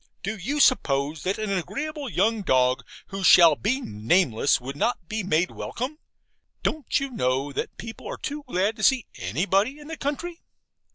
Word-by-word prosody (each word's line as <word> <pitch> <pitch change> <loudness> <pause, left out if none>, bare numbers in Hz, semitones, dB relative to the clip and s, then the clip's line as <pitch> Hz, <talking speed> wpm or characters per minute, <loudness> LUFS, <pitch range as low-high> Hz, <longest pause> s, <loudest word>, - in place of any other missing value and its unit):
Do 205 +4 -2
you 250 +10 -3
suppose 145 - +2
that 190 +2 -1
an 215 -2 -3
agreeable 275 - -3
young 220 +3 +1
dog, 130 -7 +2 0.3
who 195 0 -5
shall 170 -4 +8
be 245 - 0
nameless, 115 - +2
would 135 +2 -7
not 185 +1 -1
be 215 +3 -2
made 180 -2 +1
welcome? 275 +6 -5 0.6
Don't 310 -5 0
you 275 -1 -4
know 135 - 0
that - - -4
people 225 0 -8
are - - -5
too 295 +1 -5
glad 205 -1 0
to - - -7
see 260 -1 +4
ANYBODY 195 - 0
in 295 +1 -12
the 320 - -5
country? 335 +5 -4
200 Hz, 170 wpm, -25 LUFS, -, 0.6 s, shall